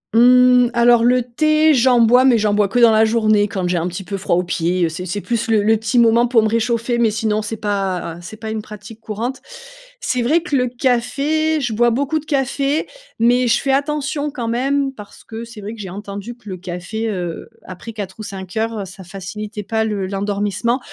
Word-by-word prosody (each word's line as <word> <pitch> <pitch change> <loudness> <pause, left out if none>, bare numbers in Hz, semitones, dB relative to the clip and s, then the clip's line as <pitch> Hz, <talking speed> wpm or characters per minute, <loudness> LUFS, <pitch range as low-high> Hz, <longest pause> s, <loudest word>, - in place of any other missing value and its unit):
Hum, 250 +1 +6
alors, 235 0 +5
le 250 0 +3
thé, 310 +5 +2
j'en 250 -1 +4
bois, 245 +3 +5
mais 255 -3 +5
j'en 210 -1 +1
bois 205 -1 +2
que 195 - -3
dans 235 -2 +6
la 220 0 +4
journée 215 -2 +2
quand 190 -3 -3
j'ai 180 - 0
un 170 - -2
petit 180 +2 -6
peu 200 +2 -5
froid 185 - 0
aux 180 - +1
pieds, 175 +1 0
heu, - - -1
c'est 180 +3 -6
c'est 205 +4 -3
plus 235 0 -2
le 215 -2 +3
le 220 +2 +4
petit 220 +2 -2
moment 235 0 +4
pour 235 -3 +3
me - - +2
réchauffer, 235 +1 0
mais 230 - +3
sinon 215 0 -1
c'est 215 +1 -5
pas 195 -5 -2
c'est 195 +5 -10
pas 220 0 -6
une 220 -1 -3
pratique 210 +1 -11
courante. 225 +4 -4 0.6
C'est 250 - -1
vrai 300 +8 +2
que 300 -5 -2
le 250 -1 +2
café, 280 +6 0
je 240 -4 -2
bois 240 +2 +3
beaucoup 280 +6 0
de 305 - -14
café 275 +1 0 0.3
mais 245 +2 +3
je 235 0 +3
fais 275 - -1
attention 290 +1 -1
quand 250 -5 -5
même 270 +3 0
parce 210 -4 -13
que 225 +1 -8
c'est 230 -2 -11
vrai 210 +3 -6
que 225 - -12
j'ai 190 - -7
entendu 200 +4 -7
que 230 - -20
le 185 -2 -5
café, 185 +5 -5
heu, 175 -5 -5 0.2
après 185 +5 -9
16:00 200 -2 -7
ou 215 - -6
17:00, 205 +3 -4
heu, - - -5
ça 190 +1 -12
facilitait 205 +3 -7
pas 220 +2 -1
le 210 -3 -2
l'endormissement 205 +5 -1
225 Hz, 225 wpm, -19 LUFS, 205-245 Hz, 0.6 s, Hum